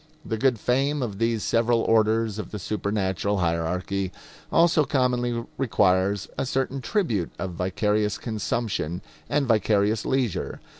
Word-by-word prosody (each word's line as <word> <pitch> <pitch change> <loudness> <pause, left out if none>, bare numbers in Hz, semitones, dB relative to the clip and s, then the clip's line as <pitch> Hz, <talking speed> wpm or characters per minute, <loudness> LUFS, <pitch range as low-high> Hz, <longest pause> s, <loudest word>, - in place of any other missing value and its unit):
The 110 - -2
good 130 -3 +2
fame 135 +5 +1
of 105 -4 -5
these 115 -1 +1
several 115 0 +2
orders 110 -1 +2
of - - -5
the 105 - -5
supernatural 100 0 -1
hierarchy 90 +2 -1 0.4
also 165 -2 +4
commonly 125 -4 0
requires 100 -5 +2
a - - 0
certain 135 +1 -1
tribute 125 - 0
of 95 - -4
vicarious 105 +4 0
consumption 110 -6 -2 0.3
and 145 -1 +1
vicarious 110 -1 +2
leisure. 130 -7 -1
110 Hz, 130 wpm, -25 LUFS, 100-125 Hz, 0.4 s, also